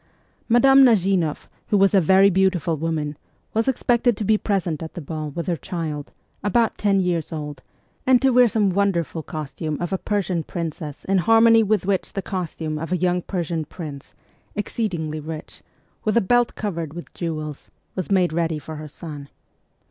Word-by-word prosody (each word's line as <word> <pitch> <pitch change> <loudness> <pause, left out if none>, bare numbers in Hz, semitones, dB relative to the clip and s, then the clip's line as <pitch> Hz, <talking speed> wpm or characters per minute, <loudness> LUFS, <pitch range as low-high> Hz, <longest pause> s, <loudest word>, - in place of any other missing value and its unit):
Madame 270 +3 +7
Nazimoff, 190 - +2 0.2
who 205 - +2
was 195 0 +4
a 195 - +6
very 190 +4 +5
beautiful 185 -3 +2
woman, 155 -1 -2 0.4
was 225 +2 +1
expected 240 -3 +2
to - - -2
be 215 +2 +3
present 190 -7 -1
at 160 - -7
the - - -4
ball 155 0 -5
with 170 +4 -4
her 175 - 0
child, 155 -2 -5 0.3
about 225 +3 +2
ten 200 -2 +2
years 175 -3 -1
old, 150 -2 -6 0.5
and 260 -1 +6
to 270 +1 +3
wear 250 0 +6
some 210 -4 +2
wonderful 180 -4 0
costume 155 0 -5
of 175 +1 -3
a 190 - 0
Persian 195 -4 -1
princess 160 -3 -6
in 195 0 +2
harmony 225 +3 +6
with 210 -3 +1
which 195 -1 -1
the 195 - -3
costume 160 -4 -4
of 165 +2 -5
a 180 - +2
young 180 +1 +1
Persian 170 -3 -2
prince, 150 -3 -9 0.4
exceedingly 175 -8 -2
rich, 155 +1 -8 0.4
with 215 +1 +1
a - - +8
belt 240 +3 +2
covered 170 -7 -4
with 175 - -9
jewels, 155 -4 -5 0.2
was 185 - -4
made 185 -4 +2
ready 165 -1 0
for 155 +1 -8
her 155 0 -7
son. 145 -2 -9
180 Hz, 175 wpm, -23 LUFS, 160-205 Hz, 0.5 s, a